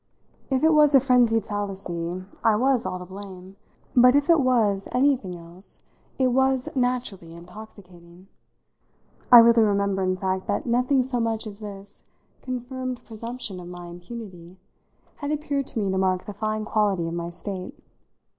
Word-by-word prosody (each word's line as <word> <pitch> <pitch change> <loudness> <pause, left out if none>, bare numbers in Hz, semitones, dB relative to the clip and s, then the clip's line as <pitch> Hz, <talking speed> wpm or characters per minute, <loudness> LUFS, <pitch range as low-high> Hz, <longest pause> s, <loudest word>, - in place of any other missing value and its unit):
If 265 0 0
it 320 0 +5
was 300 -2 +5
a - - +9
frenzied 240 -4 +3
fallacy 185 -4 -4 0.2
I 220 - +4
was 250 +1 +1
all 185 - -3
to 180 - -8
blame, 190 0 -10 0.4
but 250 +1 +7
if 290 +4 +3
it 330 - +5
was 225 -7 +2
anything 250 -8 +1
else 170 +3 -6 0.3
whatever 255 -1 +2
it - - -1
was 265 0 +1
naturally 245 -9 -2
intoxicating. 180 -1 -14 1.0
I 245 - +12
really 230 0 +7
remember 200 -2 +1
in 185 0 0
fact 190 0 -2
that 205 - -1
nothing 250 +2 +2
so 250 -1 0
much 225 -1 -1
as 205 -1 -8
this 200 -2 -8 0.4
confirmed 255 0 -5
presumption 230 -3 -6
of 175 - -9
my 175 0 -9
impunity 175 0 -10 0.6
had 285 - -5
appeared 290 -2 -2
to 235 - -2
me 200 -2 0
to 190 - 0
mark 185 -1 0
the 205 - -7
fine 215 +1 -3
quality 205 -6 +1
of 165 - -4
my 170 0 -4
state. 185 +1 -7
215 Hz, 165 wpm, -24 LUFS, 185-250 Hz, 1.0 s, I